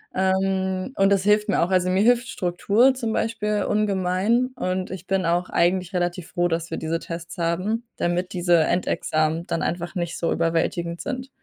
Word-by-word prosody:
Ähm, 190 +3 0
und 195 0 +3
das 195 -2 +3
hilft 210 +1 +3
mir - - +2
auch. 170 - +1
Also, 185 -1 +2
mir 190 +2 +2
hilft 245 +1 +3
Struktur 205 +8 +2
zum 235 -4 -3
Beispiel 210 -2 -1
ungemein, 205 +3 +1
und 185 -5 -2
ich 185 -1 -8
bin 190 -2 0
auch 175 +2 0
eigentlich 180 +2 +1
relativ 175 0 -2
froh, 175 -1 +1
dass 165 -1 -3
wir 160 - -2
diese 160 +1 -2
Tests 165 0 -7
haben, 185 +8 -1
damit 180 +2 -1
diese 175 -1 +3
Endexamen 160 -1 0
dann 165 - -1
einfach 175 +2 -3
nicht 170 -2 -3
so 170 - -1
überwältigend 170 +1 -1
sind. 255 -1 -5
185 Hz, 180 wpm, -23 LUFS, 170-205 Hz, -, und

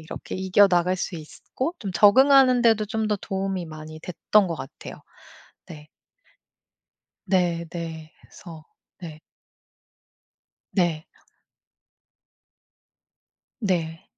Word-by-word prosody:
이렇게 160 - -8
이겨나갈 185 -1 +3
수 180 - -4
있었고 255 - -6
좀 200 -4 -6
적응하는 255 +7 +5
데도 220 -2 +3
좀 220 0 -2
더 210 - 0
도움이 190 -2 -4
많이 155 0 -10
됐던 185 +4 +1
것 165 - -3
같아요. 135 -1 -9 0.7
네. 150 -2 -12 1.4
네 175 -3 +1
네. 160 -2 -7
그래서 160 -3 -13 0.4
네. 160 -3 -9 1.5
네. 170 -5 0 2.5
네. 165 -6 -2
180 Hz, 170 characters per minute, -24 LUFS, 160-205 Hz, 2.5 s, 적응하는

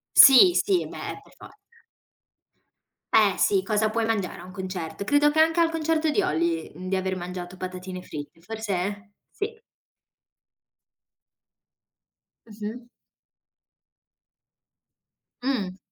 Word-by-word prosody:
Sì, 275 +7 +9
sì, 380 -1 +1
beh, - - -7
per - - -22
forza. - - -14 1.6
Eh - - +4
sì, 395 -3 +3
cosa 215 - +1
puoi 225 +1 -1
mangiare 220 -5 -2
a - - -10
un 185 - -11
concerto, 185 -3 -6
credo 290 +5 +3
che 305 - -2
anche 325 +2 +3
al 330 -1 +3
concerto 320 -1 0
di - - +2
Olly, 165 +1 -1
mhmm, 180 +3 -8
di 190 - +1
aver 190 0 -2
mangiato 180 0 -7
patatine 185 0 -7
fritte 150 0 -9
forse. 205 -1 -4 0.2
Sì. 440 +2 -5 2.9
Mh-mh. 220 +3 -8 2.5
Mh. 205 -8 -2
205 Hz, 115 wpm, -25 LUFS, 185-290 Hz, 2.9 s, Sì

